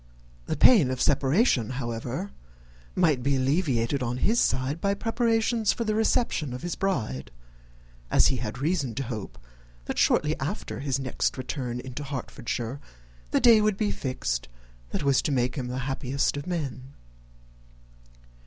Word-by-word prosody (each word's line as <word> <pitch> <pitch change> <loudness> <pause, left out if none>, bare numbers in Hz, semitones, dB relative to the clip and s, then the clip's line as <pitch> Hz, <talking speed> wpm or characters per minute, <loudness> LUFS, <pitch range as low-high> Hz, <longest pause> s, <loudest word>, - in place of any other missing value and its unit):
The - - -2
pain 195 - +6
of 130 0 -2
separation, 135 - +3
however, 125 - -4 0.6
might 160 -8 +3
be 140 +2 +1
alleviated 135 -2 +1
on 125 0 -1
his 225 - +2
side 135 +5 0
by 200 0 +1
preparations 225 0 +1
for 235 - -2
the 215 -1 0
reception 215 - +1
of 125 - -8
his 175 -1 -2
bride, 120 - -2 0.8
as - - +5
he 130 - 0
had 125 +1 -4
reason 140 -4 -1
to 135 - -2
hope, 110 -5 -6 0.5
that - - -3
shortly 150 +1 +3
after 135 - -4
his 135 -1 -1
next 135 0 -1
return 125 -2 -4
into 130 +3 -6
Hertfordshire, 130 -2 -4 0.5
the - - +2
day 230 -3 +7
would 210 -2 +1
be 210 -1 0
fixed 60 - -3 0.4
that - - -3
was 140 -2 +3
to - - -1
make 125 -2 +1
him 130 -4 -3
the 125 +1 -4
happiest 135 +1 -1
of 145 +3 -5
men. 140 -6 -4
135 Hz, 155 wpm, -27 LUFS, 125-180 Hz, 0.8 s, day